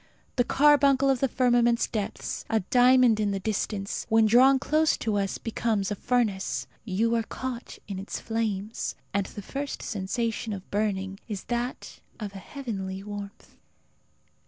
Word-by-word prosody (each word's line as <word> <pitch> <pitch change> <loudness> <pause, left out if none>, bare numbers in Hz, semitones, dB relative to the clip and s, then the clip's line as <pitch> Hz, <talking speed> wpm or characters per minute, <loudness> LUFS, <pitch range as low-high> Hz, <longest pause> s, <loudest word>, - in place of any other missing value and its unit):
The 245 - +3
carbuncle 275 0 +4
of 265 - 0
the 270 - +2
firmament's 240 -2 +3
depths, 210 -3 -4
a 225 - +2
diamond 245 +1 +5
in 210 -1 +1
the 195 -1 -1
distance, 200 0 -2
when 225 0 +5
drawn 255 +5 +6
close 310 +3 +2
to 220 -2 -1
us 195 -1 -1
becomes 220 -3 -1
a - - 0
furnace. 220 -4 0 0.2
You 225 +3 0
are 230 - +2
caught 250 +2 -6
in 195 -2 -4
its 195 - -5
flames. 220 -2 -2 0.2
And 200 -1 0
the 205 - -8
first 280 +6 -5
sensation 225 +2 -2
of 190 -2 -9
burning 195 -2 -1
is 205 -4 -5
that 240 +2 -4 0.2
of 205 -3 -5
a 195 - -7
heavenly 195 -7 -5
warmth. 205 0 -8
225 Hz, 155 wpm, -27 LUFS, 200-245 Hz, 0.2 s, drawn